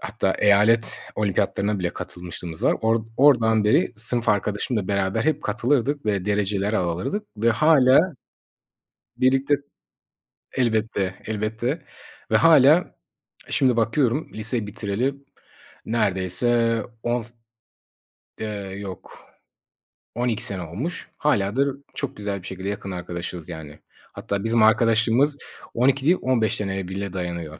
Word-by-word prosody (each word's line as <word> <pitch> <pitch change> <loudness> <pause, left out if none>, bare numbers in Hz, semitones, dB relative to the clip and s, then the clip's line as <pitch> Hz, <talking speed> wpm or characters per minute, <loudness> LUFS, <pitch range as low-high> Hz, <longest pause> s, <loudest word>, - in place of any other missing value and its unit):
hatta, 100 -2 -1
eyalet 105 +3 +3 0.2
olimpiyatlarına 100 0 0
bile 90 -2 -1
katılmışlığımız 85 -2 -8
var. - - +3
Or 115 0 +1
oradan 115 -6 +4
beri 105 - +3
sınıf 115 +1 -2
arkadaşımla 105 0 0
beraber 100 +2 0
hep 155 - +1
katılırdık 125 +5 0
ve 100 -3 0
dereceler 105 0 0
alırdık 90 - -1
ve 115 +3 +2
hâlâ 135 +1 +5 1.2
Birlikte, 135 +2 +3 1.0
elbette, 110 -6 0
elbette, 110 +7 -2 0.5
ve, - - +5
hâlâ, 155 -2 +7
eee, 180 - -5 0.6
şimdi 130 -3 +2
bakıyorum, 120 +5 +1
lise 110 +1 -3
bitireli 105 +6 -2 0.7
neredeyse 115 +2 +1 0.2
10 120 +1 0
s 115 +1 -10 1.1
eee, 110 - -3 0.3
yok, 95 -3 -9 0.9
12 120 -2 -1
sene 100 -6 -3
olmuş. 125 - -5
Hâlâ 105 -9 +1
da, - - +4
r - - 0 0.3
çok 140 - -3
güzel 100 -2 -4
bir 90 - -10
şekilde 95 +1 -5
yakın 100 -1 -5
arkadaşız, 90 -1 -6
yani. 80 -3 -9 0.3
Hatta, 100 0 -3
bizim 115 0 +3
arkadaşlığımız 115 +5 +3 0.4
12 130 +3 +2
değil, 175 +4 +5
15 115 -4 +1
seneye 95 -4 -3
bile 95 0 -5
dayanıyor. 85 -4 -5
110 Hz, 120 wpm, -23 LUFS, 100-125 Hz, 1.2 s, hâlâ